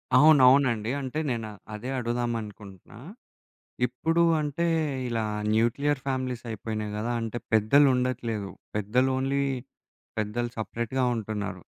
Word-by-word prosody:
అవును. 150 0 +7
అవునండి. 120 -5 +3
అంటే 135 +4 -3
నేను 115 -2 -3 0.2
అదే 115 +5 -5
అడుగుదామనుకుంటున్నా, 115 -4 -4 0.9
ఇప్పుడు 165 +7 +1 0.2
అంటే 150 +3 -1 0.4
ఇలా 115 -2 -1 0.3
న్యూక్లియర్ 135 +6 +1
ఫ్యామిలీసయిపోయినాయి 115 -5 -3
గదా! 115 +3 -2
అంటే 115 +1 -3 0.2
పెద్దలుండట్లేదు. 120 -3 +3 0.3
పెద్దలు 120 +6 +2
ఓన్లీ 135 +1 0 0.8
పెద్దలు 120 +3 -1
సెపరేట్‌గా 120 +4 -2
ఉంటున్నారు. 105 -2 -4
120 Hz, 95 wpm, -27 LUFS, 110-130 Hz, 0.9 s, అవును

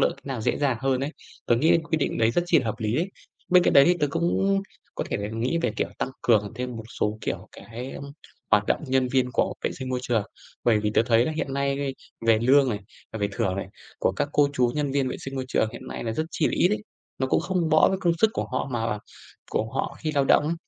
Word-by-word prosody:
lựa - - +4
cách - - -21
nào 130 -5 -3
dễ - - 0
dàng 140 -4 +1
hơn 135 -1 +1
ấy. 140 +2 -2 0.4
Tớ 120 - +4
nghĩ 160 +6 +4
quyết 165 -1 -1
định 140 - -1
đấy 115 0 +4
rất 175 - +1
chi 165 -2 +5
là 130 - -2
hợp 110 - -1
lý 110 0 -1
đấy. 175 +5 0 0.4
Bên 180 -1 +6
cạnh - - +3
đấy 140 -1 +8
thì 180 - +4
tớ 145 - +3
cũng 190 +5 +1 0.3
có - - -2
thể - - 0 0.2
nghĩ 125 +9 0
về, - - +1
kiểu, - - 0
tăng - - -1
cường 105 -2 +3
thêm 125 0 -4
một 110 - -7 0.2
số, 105 +1 0
kiểu, - - -4
cái 120 +3 -8 0.6
hoạt 105 0 +4
động - - +1
nhân 130 -1 +2
viên 125 -1 +1
của - - +1
vệ - - +1
sinh 130 - -5
môi 130 0 -1
trường. 115 -4 +1 0.4
Bởi 115 -3 +4
vì 105 0 0
tớ - - +5
thấy 115 0 +4
là 155 - -1
hiện 155 -3 -3
nay, 140 0 -1 0.3
về 115 -1 +5
lương 135 +3 +5
này, 105 - -2 0.4
về 100 - 0
thưởng 95 -1 -1
này, 100 - -3 0.3
của - - +1
các - - -1
cô 145 -1 +4
chú 125 -3 +2
nhân 145 -2 -1
viên 135 -2 +1
vệ - - -4
sinh 135 0 -6
môi 130 - -2
trường 110 - +1
hiện - - -9
nay - - -5
là 115 - -1
rất 155 - -1
chi 155 - +1
là - - -1
ít 175 - +4
ấy. 210 - -1 0.4
Nó 130 - +1
cũng 130 - +2
không 175 -2 0
bõ 155 0 +5
với 190 - -1
công 170 -2 +3
sức 220 - +4
của - - -2
họ 130 - -1
mà 115 -2 -1 0.5
của 110 +1 -1
họ - - -2
khi 155 -1 -2
lao 140 -1 +3
động 145 - +5
ấy. 160 +3 0
130 Hz, 265 wpm, -25 LUFS, 115-155 Hz, 0.6 s, đấy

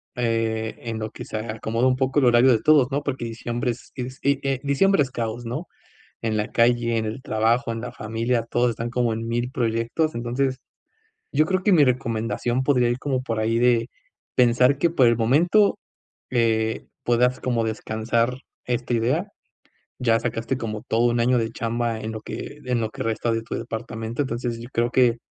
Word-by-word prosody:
eh, 115 -2 -1
en 115 -2 -4
lo 110 0 -4
que - - -8
se 110 - -5
acomoda 115 +2 -1
un 130 - +3
poco 135 +2 +1
el 135 - +3
horario 120 +2 +6
de 110 -3 +2
todos, 150 -4 +5
¿no?, 140 +2 0
porque 135 -4 -3
diciembre 120 +1 -2
es 120 - -10
es, 130 +1 -6
eh 140 0 +2
eh, 135 -1 0
diciembre 145 +6 +3
es 130 - -7
caos, 115 +1 -4
¿no? 120 +2 -4 0.5
En 110 -1 -1
la 105 - -2
calle, 115 0 +3
en 110 - 0
el 110 +5 -5
trabajo, 115 +2 +1
en 115 - -5
la 125 - -5
familia, 115 +1 -1
todos 120 0 +2
están 115 +1 -4
como 120 -2 +1
en 115 +1 -4
mil 120 +2 -1
proyectos, 115 +6 0
entonces, 130 +3 -1 0.7
yo 155 - +3
creo 185 0 0
que 205 - +4
mi 155 -4 +6
recomendación 120 0 0
podría 125 -3 +3
ir 120 - -1
como 130 -3 -1
por 115 -3 -3
ahí 115 +1 +1
de 120 -1 +3 0.5
pensar 125 +2 +4
que, 170 +4 +2
por 135 -7 +4
el 115 - +3
momento, 170 - +3 0.5
eh, 110 -2 +1 0.2
puedas 125 +1 +2
como 120 -3 0
descansar 110 +2 -1 0.3
esta 120 0 -2
idea. 130 - +1 0.7
Ya 115 -2 +3
sacaste 115 +2 -2
como 110 -3 -5
todo 115 +2 +2
un 120 - 0
año 125 +1 +3
de 115 -1 -2
chamba 115 -1 -2
en 110 +1 -4
lo 110 - -6
que 150 - -7
en 125 -1 0
lo 110 - -1
que - - -5
resta 115 +1 -1
de 115 - -1
tu - - -5
departamento, 115 +2 -4
entonces 120 -1 -3
yo 120 - -9
creo 120 +1 +1
que 125 -2 +4
120 Hz, 195 wpm, -24 LUFS, 115-130 Hz, 0.7 s, horario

